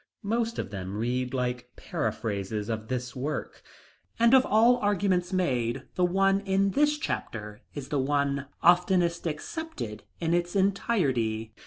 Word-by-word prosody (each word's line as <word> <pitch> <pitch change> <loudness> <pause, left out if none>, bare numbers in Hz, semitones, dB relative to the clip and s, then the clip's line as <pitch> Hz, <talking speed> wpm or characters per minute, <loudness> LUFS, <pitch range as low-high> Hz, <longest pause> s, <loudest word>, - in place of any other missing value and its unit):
Most 230 +2 -1
of - - -4
them 95 0 -5
read 125 +3 -1
like 125 -1 -2
paraphrases 105 0 -3
of 110 -1 -3
this 125 0 -3
work. 145 +4 -4 0.6
And 235 +2 +5
of 260 -1 +6
all 230 +4 +5
arguments 200 -4 +1
made, 130 -9 0
the 180 - 0
one 195 +2 +3
in 195 0 +1
this 295 +4 +3
chapter 105 - -4
is 140 -3 -6
the 145 - 0
one 140 0 0 0.2
oftenest 175 0 +3
accepted 150 - -5 0.2
in 165 0 0
its 175 +1 0
entirety. 135 - +1
155 Hz, 140 wpm, -28 LUFS, 120-195 Hz, 0.6 s, of